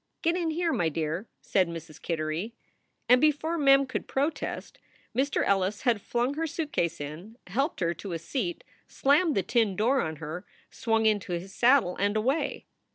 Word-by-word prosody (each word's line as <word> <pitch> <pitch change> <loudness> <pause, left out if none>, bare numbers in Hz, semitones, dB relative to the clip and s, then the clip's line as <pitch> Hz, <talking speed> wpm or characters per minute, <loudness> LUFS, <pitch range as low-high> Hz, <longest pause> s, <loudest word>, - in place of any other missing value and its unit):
"Get 335 +1 +2
in 345 -2 0
here, 335 +1 0
my 165 -2 +1
dear," 160 +6 -3 0.2
said 190 -3 +2
Mrs. 165 -2 -9
Kittery. 165 +7 -3 0.5
And 250 +1 +6
before 310 +2 +2
Mem 275 -1 +6
could 260 - -4
protest 290 +4 -2 0.4
Mr. 275 +3 +1
Ellis 195 +1 +1
had 235 -5 +2
flung 240 +5 0
her 325 +2 -2
suitcase 285 - -2
in, 160 +10 -8
helped 270 - -1
her 170 -1 +1
to 180 +2 -7
a - - -1
seat, 175 - -3 0.2
slammed 295 +3 +3
the 195 - +2
tin 225 -5 +1
door 245 +7 +2
on 160 0 -3
her, 160 +4 -6 0.3
swung 225 -1 0
into 205 -4 +1
his 180 +3 -5
saddle 240 -7 +4
and 205 +2 +1
away. 275 +6 0
220 Hz, 170 wpm, -28 LUFS, 175-275 Hz, 0.5 s, And